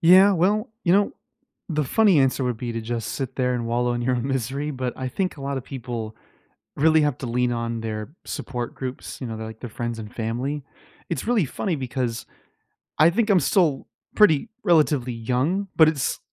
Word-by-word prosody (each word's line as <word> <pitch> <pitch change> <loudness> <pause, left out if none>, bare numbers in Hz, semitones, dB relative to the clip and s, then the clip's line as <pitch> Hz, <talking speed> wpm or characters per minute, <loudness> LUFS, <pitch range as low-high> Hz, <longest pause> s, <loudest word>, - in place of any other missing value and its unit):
Yeah. 185 +4 +7
Well, 205 +6 +1
you 170 - +4
know, 200 +1 +3 0.6
the 155 -3 0
funny 195 - +4
answer 135 0 +2
would 125 -2 -1
be 120 0 -4
to 115 - -3
just 115 0 -3
sit 135 -3 -4
there 125 -1 +1
and 120 -1 -2
wallow 120 +1 +1
in 120 0 -2
your 130 +1 +1
misery, 135 +3 -2
but 130 -3 -3
I 130 - -3
think 185 +6 -2
a 140 - -9
lotta 140 -1 -2
people 120 -4 -6 0.6
really 160 +2 +4
have 145 -4 +1
to 130 - -4
lean 125 +1 +1
on 115 -1 -2
their 110 +1 -4 0.2
support 120 -2 -4
groups, 130 -1 -6
you 125 - -3
know, 110 - -5
their, 110 - -5
like, 110 0 -9
their 120 - -7
friends 120 +1 -4
and 110 +1 -8
family. 125 +6 -2 0.5
It's 170 - -3
really 230 -8 +3
funny 170 +6 -2
because 125 -3 -3 0.7
I 155 +2 +7
think 225 +3 +1
I'm 195 -3 +6
still 160 -3 +2 0.3
pretty 210 -1 +5
relatively 145 -7 +3
young, 130 - 0
but 160 - +7
it's 150 -4 0
130 Hz, 195 wpm, -24 LUFS, 120-160 Hz, 0.7 s, Yeah